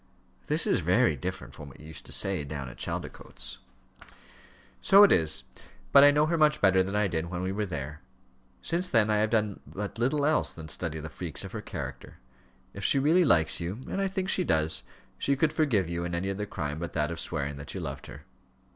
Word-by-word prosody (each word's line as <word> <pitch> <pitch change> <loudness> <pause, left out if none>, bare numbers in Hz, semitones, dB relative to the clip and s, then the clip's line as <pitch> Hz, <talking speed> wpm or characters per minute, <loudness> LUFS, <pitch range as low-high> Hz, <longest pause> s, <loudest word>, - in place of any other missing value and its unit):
"This - - 0
is - - +2
very - - +3
different - - -6
from 75 -2 -10
what 65 - -15
you 75 - -13
used 80 0 -10
to - - -11
say, 95 -6 +1
down 70 -2 -6
at - - -12
Chaldicotes." - - -6 1.2
"So 200 +1 +8
it 205 - +6
is; 80 -3 +2 0.5
but 140 - +8
I 145 - +9
know 150 +1 +3
her 165 +1 0
much 150 -1 +4
better 95 -1 +4
than 95 +2 -2
I 105 -1 +2
did 85 -2 -2
when 90 +1 -4
we 95 - -1
were 105 +1 -2
there. 75 -2 -6 0.6
Since 180 +2 0
then 115 - +3
I 105 - +3
have 110 +1 +2
done 105 -3 0
but 105 +3 -6
little 140 +4 +1
else 155 +1 +3
than 80 -1 -9
study 80 0 -3
the 80 - -6
freaks 80 -2 -4
of - - -8
her - - -5
character. - - -7 0.6
If 100 - -8
she 140 - +4
really 160 +7 +4
likes 85 - +3
you 95 +10 -5
and 195 - -2
I 195 - +1
think 190 0 -3
she 185 - +2
does 80 - +1 0.4
she 140 - +1
could 150 +3 +1
forgive 130 - +1
you 85 0 -3
any 85 +3 -2
other 105 +2 -4
crime 75 -4 -4
but 85 0 -5
that 75 +1 0
of 85 - -5
swearing 70 -3 -3
that 70 - -8
you - - -3
loved 70 -1 -6
her." - - -11
95 Hz, 220 wpm, -28 LUFS, -, 1.2 s, I